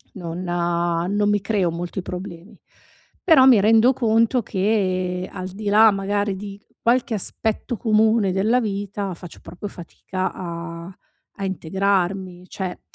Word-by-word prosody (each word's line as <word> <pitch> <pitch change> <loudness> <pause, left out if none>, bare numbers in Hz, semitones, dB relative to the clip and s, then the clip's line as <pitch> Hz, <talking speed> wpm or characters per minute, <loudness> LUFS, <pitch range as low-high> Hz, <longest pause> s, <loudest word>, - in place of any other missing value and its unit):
non 175 -1 -6
non 175 +3 0
mi 205 -1 +2
creo 200 -4 0
molti 175 +2 -5
problemi. 180 0 -8 0.6
Però 320 -8 +6
mi 240 -6 +7
rendo 225 +4 +5
conto 230 0 +2
che, 185 -3 -1
al 185 -1 -6
di 205 +2 -6
là 215 +2 +7
magari 200 0 -1
di 200 0 -8 0.2
qualche 240 -1 +1
aspetto 220 +4 -1
comune 220 -2 +2
della 220 +6 +2
vita, 200 -2 -3
faccio 175 0 -11
proprio 180 +5 -8
fatica 185 +1 -5
a 170 +1 -7 0.4
a - - -2
integrarmi, 190 0 -1
cioè 185 -2 -5
195 Hz, 130 wpm, -22 LUFS, 180-215 Hz, 0.6 s, mi